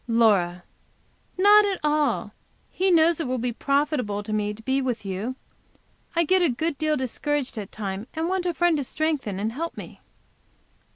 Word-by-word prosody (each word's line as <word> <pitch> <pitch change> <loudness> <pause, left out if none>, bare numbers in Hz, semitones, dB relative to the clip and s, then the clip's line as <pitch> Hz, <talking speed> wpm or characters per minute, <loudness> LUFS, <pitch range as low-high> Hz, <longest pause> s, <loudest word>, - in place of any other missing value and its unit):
Laura. 200 -7 +2 0.7
"Not 410 +3 +7
at 400 -2 -1
all. 300 0 +1 0.4
He 380 +1 +1
knows 335 -1 +4
it 320 - -2
will 255 0 -1
be 240 0 -2
profitable 275 -7 0
to 215 +1 -5
me 210 -1 0
to 215 +2 -11
be 265 +3 +1
with 245 -5 -3
you. 195 +7 -3 0.8
I 335 - +4
get 370 +3 +3
a 345 - +3
good 315 +6 -1
deal 310 -1 +1
discouraged 270 +2 -2
at 200 - -7
times, 200 +1 -5
and 320 +1 -1
want 370 0 -1
a 350 - 0
friend 345 -2 +3
to 285 - -1
strengthen 280 -9 -2
and 215 +2 -1
help 330 +7 -5
me." - - -10
275 Hz, 180 wpm, -25 LUFS, 220-325 Hz, 0.8 s, Not